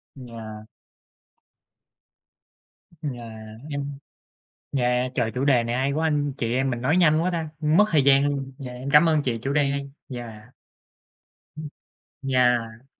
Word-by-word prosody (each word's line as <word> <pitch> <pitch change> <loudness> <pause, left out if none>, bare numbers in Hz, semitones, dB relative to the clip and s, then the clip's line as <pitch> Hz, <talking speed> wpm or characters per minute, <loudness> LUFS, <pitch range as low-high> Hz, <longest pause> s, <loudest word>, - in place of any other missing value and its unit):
Yeah. 115 -4 -9 2.5
Yeah, 120 -2 -9 0.4
em 140 -1 -4 0.8
yeah, 125 0 +1
trời, 115 - 0
chủ 130 +2 -1
đề 130 -4 +4
này 120 +1 -2
hay 135 +2 0
quá, 160 +2 0
anh 145 -2 0
chị 115 0 -1
em 130 +1 +1
mình 120 -1 -3
nói 145 +7 +2
nhanh 160 -3 +4
quá 180 - +1
ta, 165 -3 -3
mất 155 +7 +4
thời 150 -4 +4
gian 140 0 +5
luôn. 135 -2 -3
Dạ, 130 -3 -7
em 130 +3 -6
cảm 155 +3 +7
ơn 155 -2 +2
chị, 120 -4 -1
chủ 135 - -1
đề 145 -2 +2
hay, 140 0 -4 0.2
yeah. 120 -2 -9 1.0
Ừm, 155 -1 -5 0.6
yeah. 120 -2 +1
135 Hz, 150 wpm, -24 LUFS, 120-145 Hz, 2.5 s, cảm